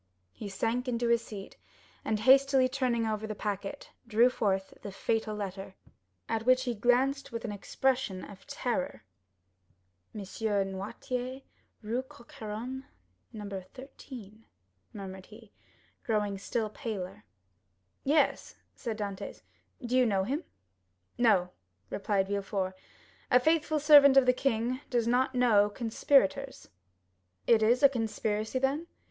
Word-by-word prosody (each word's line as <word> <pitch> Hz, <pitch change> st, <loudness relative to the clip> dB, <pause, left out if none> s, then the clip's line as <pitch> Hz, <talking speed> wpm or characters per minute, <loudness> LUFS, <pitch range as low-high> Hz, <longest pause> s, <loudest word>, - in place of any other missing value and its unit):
He 205 Hz, -, -7 dB
sank 230 Hz, +6 st, -1 dB
into 240 Hz, -1 st, 0 dB
his 235 Hz, 0 st, +3 dB
seat, 200 Hz, -4 st, -9 dB, 0.5 s
and 215 Hz, -1 st, -1 dB
hastily 270 Hz, +1 st, +6 dB
turning 255 Hz, -3 st, 0 dB
over 220 Hz, 0 st, -2 dB
the 215 Hz, -, -4 dB
packet, 205 Hz, +5 st, -4 dB, 0.2 s
drew 235 Hz, +2 st, +4 dB
forth 195 Hz, -5 st, -1 dB
the 200 Hz, -, -6 dB
fatal 220 Hz, +2 st, -1 dB
letter, 195 Hz, -2 st, -6 dB, 0.5 s
at 225 Hz, 0 st, -1 dB
which 255 Hz, +2 st, +4 dB
he 245 Hz, -2 st, -1 dB
glanced 255 Hz, +5 st, +1 dB
with 230 Hz, 0 st, -5 dB
an 220 Hz, -, -3 dB
expression 245 Hz, -1 st, -1 dB
of 195 Hz, -2 st, -13 dB
terror. 275 Hz, +3 st, -3 dB, 1.1 s
"M. 210 Hz, -, -4 dB
Noirtier, 220 Hz, +6 st, -3 dB, 0.4 s
Rue 230 Hz, +4 st, -1 dB
Coq 240 Hz, -2 st, -17 dB
Héron, 235 Hz, +5 st, -6 dB, 0.5 s
No. 210 Hz, -2 st, -7 dB, 0.3 s
13," 245 Hz, -5 st, -11 dB, 0.5 s
murmured 190 Hz, -2 st, -8 dB
he, 220 Hz, 0 st, -15 dB, 0.5 s
growing 210 Hz, -3 st, 0 dB
still 215 Hz, +2 st, -2 dB
paler. 200 Hz, -, -5 dB, 0.8 s
"Yes," 280 Hz, -1 st, +1 dB, 0.2 s
said 225 Hz, -2 st, -5 dB
Dantès; 200 Hz, -3 st, -5 dB, 0.4 s
"do 245 Hz, +1 st, -1 dB
you 255 Hz, -1 st, +5 dB
know 195 Hz, -3 st, +1 dB
him?" 280 Hz, -, -2 dB, 0.8 s
"No," 190 Hz, -7 st, +4 dB, 0.4 s
replied 195 Hz, -1 st, 0 dB
Villefort; 195 Hz, -1 st, -2 dB, 0.6 s
"a 250 Hz, -, +6 dB
faithful 315 Hz, +2 st, +2 dB
servant 285 Hz, -2 st, +8 dB
of 270 Hz, -, +7 dB
the 250 Hz, -, +5 dB
king 250 Hz, 0 st, 0 dB
does 240 Hz, -3 st, +1 dB
not 255 Hz, +2 st, +2 dB
know 220 Hz, -5 st, +4 dB
conspirators." 250 Hz, +3 st, +1 dB, 0.8 s
0103m -, -, +7 dB
"It -, -, -7 dB
is 240 Hz, +5 st, +3 dB
a 280 Hz, -, +9 dB
conspiracy, 220 Hz, -2 st, -2 dB
then?" 275 Hz, +5 st, 0 dB
230 Hz, 130 wpm, -30 LUFS, 205-260 Hz, 1.1 s, a